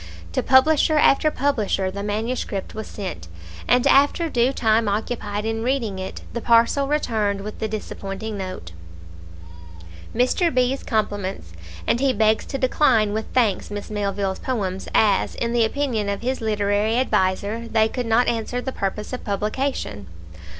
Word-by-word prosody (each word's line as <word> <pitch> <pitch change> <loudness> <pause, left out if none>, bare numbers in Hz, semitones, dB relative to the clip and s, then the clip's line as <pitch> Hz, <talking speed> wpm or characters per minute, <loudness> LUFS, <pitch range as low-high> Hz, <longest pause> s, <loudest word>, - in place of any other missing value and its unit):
To - - 0
publisher 305 +4 +4
after 300 +1 +4
publisher 220 -10 0
the 200 +1 -5
manuscript 210 -1 -3
was 220 0 -6
sent, 90 - -6 0.4
and 250 +1 +3
after 285 +4 +4
due 240 +2 +2
time 225 -4 +2
occupied 210 0 -3
in 225 0 -2
reading 230 -6 -1
it, 190 - -6
the 235 - -3
parcel 235 +5 +3
returned 220 -9 0
with 210 +1 -7
the 220 - -1
disappointing 210 0 -5
note 185 - -6 1.4
"Mr. 255 +8 +2
B 255 0 +2
's - - -11
compliments, 200 - -2 0.3
and 235 - +1
he 270 -1 +2
begs 220 0 +2
to 275 - -3
decline 240 -5 +2
with 220 +1 -2
thanks 225 -7 +2
Miss 205 0 -6
Melville's 200 -2 -2
poems, 195 -7 -3
as, 205 -3 +3
in 235 0 -2
the 235 -1 +3
opinion 225 -5 -1
of 200 +3 -3
his 260 +1 -1
literary 210 +1 +1
adviser, 210 -1 0
they 220 -1 +3
could 245 +1 -4
not 230 +2 +3
answer 235 +1 -1
the 265 +1 -4
purpose 210 +1 -4
of 255 - -5
publication." 210 - -2
220 Hz, 155 wpm, -22 LUFS, 205-250 Hz, 1.4 s, publisher